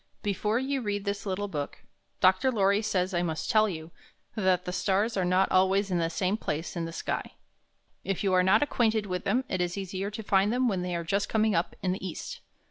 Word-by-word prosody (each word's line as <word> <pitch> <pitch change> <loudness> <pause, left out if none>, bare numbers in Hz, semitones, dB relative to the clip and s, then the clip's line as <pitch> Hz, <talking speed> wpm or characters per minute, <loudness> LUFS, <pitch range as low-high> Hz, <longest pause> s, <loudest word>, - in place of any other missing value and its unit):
Before 210 +2 0
you 265 +1 -1
read 205 -2 -2
this 200 0 -3
little 195 +2 -2
book, 145 -6 -5 0.4
Dr. 190 +8 +4
Lorry 200 -2 +3
says 190 -3 0
I 175 - +1
must 160 -3 -2
tell 215 -1 +4
you 160 -2 -7 0.4
that 185 -3 +1
the 180 - -3
stars 200 +4 +1
are 190 - +1
not 185 +2 +3
alwaj^s 190 +1 +3
in 175 - +1
the 165 -1 +1
same 185 +4 0
place 160 -5 -4
in 170 -1 -2
the 165 - -5
sky. - - -4 0.7
If 195 0 -2
you 195 -2 +2
are 185 - +5
not 190 +7 +4
acquainted 225 -6 +1
with 180 -2 -4
them, 245 +6 +2
it 185 -6 -1
is 175 +1 -1
easier 195 0 -3
to 215 +1 -7
find 200 +1 +3
them 250 +1 +2
when 190 -5 0
they 180 -1 -2
are 170 - -2
just 200 +4 -1
coming 220 -1 +2
up 170 - 0
in 185 - +1
the 190 - -4
east. 185 -4 -6
195 Hz, 225 wpm, -28 LUFS, 180-210 Hz, 0.7 s, are